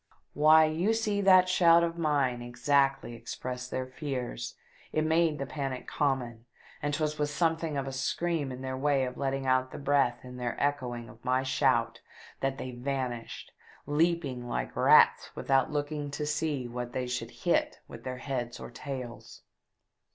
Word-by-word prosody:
Why, 155 +2 +6
you 170 +8 +1
see 210 -2 0
that 185 -2 +6
shout 170 -2 +5
of 170 0 -1
mine 145 -7 +1
exactly 135 +2 +1
expressed 125 +2 -6
their 130 - -2
fears, 130 - -5 0.4
it 155 0 +1
made 160 -1 +2
the 140 - -3
panic 135 -2 -4
common; 125 -5 -1 0.4
and 145 - -1
'twas 150 +1 -1
with 150 0 +1
something 160 0 0
of 135 - -1
a 135 - -4
scream 145 +2 -1
in 130 +1 -7
their 130 0 -3
way 140 0 +2
of 125 - -5
letting 135 -1 -2
out 130 0 +2
the - - -8
breath 140 -4 +1
in 125 0 -9
their 120 -1 -3
echoing 125 -5 -1
of 115 - -15
my 130 +1 +1
shout 130 -3 +1 0.4
that 135 0 -1
they 130 - -5
vanished, 125 -2 -4 0.3
leaping 145 -5 0
like - - -3
rats - - +5
without 135 -1 +2
looking 145 0 -2
to 150 +1 -3
see 150 -3 -1
what 120 0 -5
they 130 - -1
should 120 -2 -3 0.2
hit - - +2
with - - -11
their 130 -1 -4
heads 125 -3 -4
or - - -8
tails. 125 -2 -7
135 Hz, 165 wpm, -29 LUFS, 125-150 Hz, 0.4 s, Why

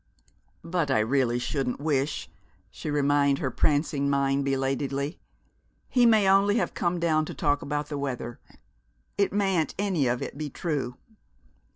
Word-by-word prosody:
"But 165 -3 -1
I 130 - +3
really 120 +2 +2
shouldn't 125 +1 -2
wish," 145 -1 -1 0.4
she 155 - -6
reminded 145 -1 +2
her 130 - -2
prancing 145 0 +1
mind 140 0 +1
belatedly. 135 +2 -1 0.7
"He 245 -2 +4
may 215 -4 +5
only 195 +2 +4
have - - -1
come 175 0 -1
down 160 -2 +2
to - - -7
talk 145 -2 +1
about 145 0 -3
the 145 -2 -3
weather. 125 -4 -4 0.8
It 200 - +3
mayn't 195 -5 +1
any 185 -9 +1
of 120 +1 0
it 140 - -7
be 150 -1 -3
true." 140 -5 -3
145 Hz, 150 wpm, -27 LUFS, 135-170 Hz, 0.8 s, may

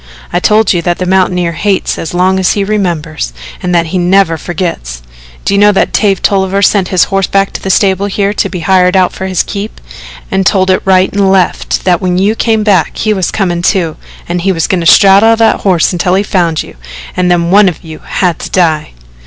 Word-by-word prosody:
I 175 - +1
told 210 +2 +2
you 175 - -1
that 175 0 -1
the 185 - -3
mountaineer 180 -2 0
hates 195 +4 -2
as 165 - -5
long 185 +1 +1
as 185 - +1
he 200 - -1
remembers, 170 - -3 0.3
and 180 -1 -1
that 170 -1 +2
he 185 - 0
never 180 -1 +2
forgets. 155 - -5 0.4
Do - - 0
you 200 - +2
know 205 0 +5
that - - 0
Dave 195 -3 +1 0.4
sent 195 -3 +1
his 185 -1 +2
horse 195 -1 -1
back 195 0 0
to - - -6
the 190 - -4
stable 195 +1 +1
here 200 0 -1
to - - -2
be 180 - -6
hired 180 +2 +2
out 185 -1 +1
for 190 - -5
his 185 -3 0
keep, 205 +1 -7 0.5
and 195 0 0
told 190 -1 +2
it 185 - +1
right 190 -1 +2
and 200 -1 +1
left 190 -2 0
that 180 0 +1
when 180 -1 -1
you 200 +3 +1
came 225 -1 0
back 190 -7 +1
he 215 - 0
was 190 -4 -1
comin', 175 -4 -2
too, 175 -4 0 0.3
and 175 0 -3
he 195 +2 +1
was 165 -4 -1
goin' 185 - -1
to 165 - 0
straddle 200 +5 +5
that 225 0 +2
horse 185 -3 +1
until 180 +1 0
he 195 - +1
found 170 -5 -1
you, - - -14 0.4
and 180 -1 0
then 170 -1 +1
one 200 0 +5
of 175 - -9
you 160 -2 -10
had 175 -4 -2
to - - -7
die? 160 - 0
185 Hz, 225 wpm, -10 LUFS, 175-195 Hz, 0.5 s, know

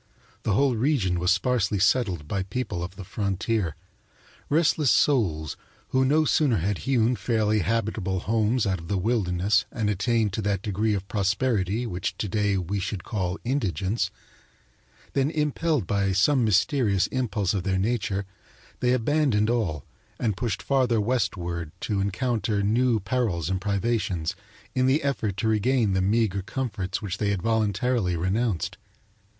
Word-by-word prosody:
The 105 - 0
whole 135 +3 +3
region 110 - +1
was 90 +1 +1
sparsely 100 +1 +2
settled 95 - +1
by 95 +4 -1
people 95 -2 -3
of 90 +2 -7
the 100 - -8
frontier 100 -2 -1 0.7
restless 150 -2 +3
souls 90 - +2 0.3
who 130 0 +2
no 150 +4 +3
sooner 140 -6 +3
had 95 +3 -1
hewn 125 -2 +3
fairly 110 0 +1
habitable 100 -2 -1
homes 110 +2 +1
out 95 -3 0
of 80 - -10
the 100 - 0
wilderness 95 -2 +1
and 105 -3 -1
attained 105 +1 +1
to 110 - -2
that 100 -2 -1
degree 105 +1 0
of 100 -1 -5
prosperity 105 +1 0
which 90 -5 -3
to 105 - -2
day 100 0 +1
we 95 +2 -2
should 95 0 -4
call 95 -3 -2
indigence 105 - -1 1.0
than 135 +1 +2
impelled 150 - 0
by 100 +1 0
some 125 +8 +3
mysterious 105 -1 +2
impulse 110 -7 0
of 100 - 0
their 95 +1 0
nature 100 -1 -1 0.5
they 125 0 +2
abandoned 125 -4 +2
all 90 - -1 0.3
and 110 -5 0
pushed 110 -3 -3
farther 130 -4 +2
westward, 90 -8 -1
to 100 -2 -1
encounter 105 0 0
new 115 +2 +2
perils 100 - -1
and 95 -1 -1
privations 100 -4 -1 0.4
in 130 0 +2
the 140 +4 +2
effort 110 -8 -1
to 110 - 0
regain 110 0 +2
the 95 - +1
meagre 100 0 +1
comforts 105 -3 -3
which 95 -4 -4
they 105 - +1
had 95 -3 -1
voluntarily 110 -3 +1
renounced. 95 +2 -1
105 Hz, 150 wpm, -26 LUFS, 95-120 Hz, 1.0 s, whole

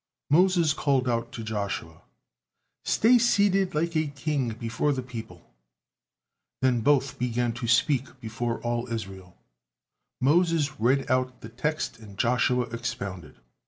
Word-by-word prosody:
Moses 175 -1 +4
called 135 -4 +1
out 115 -1 -1
to 115 - -6
Joshua, 100 -7 -4 0.8
"Stay 240 +3 +4
seated 200 -6 +2
like 165 +2 0
a 155 -1 +1
king 140 -2 -2
before 115 +5 -1
the 130 -2 -3
people!" 110 - -10 1.1
Then 125 -3 +3
both 135 +1 +2
began 120 -1 0
to 120 0 -5
speak 130 +3 +1
before 115 +1 -3
all 120 0 -2
Israel; 95 -5 -6 0.8
Moses 160 +1 +2
read 130 +4 +2
out 130 0 0
the 115 - -9
text 140 +3 -3
and 105 -3 -13
Joshua 125 +2 +2
expounded. 100 - -5
125 Hz, 125 wpm, -26 LUFS, 115-145 Hz, 1.1 s, Moses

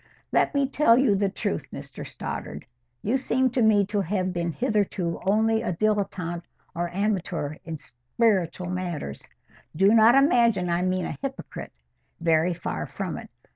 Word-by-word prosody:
"Let - - +2
me 280 -1 +3
tell 270 -4 +4
you 255 -5 +4
the 200 0 +1
truth, - - -3
Mr - - -8
Stoddart. 75 - -6 0.4
You 235 +6 +2
seem 260 -1 +1
to 245 - 0
me 210 -2 +5
to 205 +1 -1
have 185 0 -1
been 170 -1 -1
hitherto 200 - -1
only 220 +2 +3
a - - -1
dilettante 195 -3 -1 0.3
or 175 +1 -2
amateur 180 -6 -2
in 165 -1 -5
spiritual 175 - -1
matters. 175 - -4 0.5
Do 195 +6 +5
not 230 +2 +7
imagine 235 - +4
I 170 +1 +1
mean 185 0 0
a - - -5
hypocrite. 275 -1 -6 0.5
Very 165 +1 +2
far 80 - -4
from - - -4
it. - - -11
195 Hz, 155 wpm, -25 LUFS, 170-225 Hz, 0.5 s, not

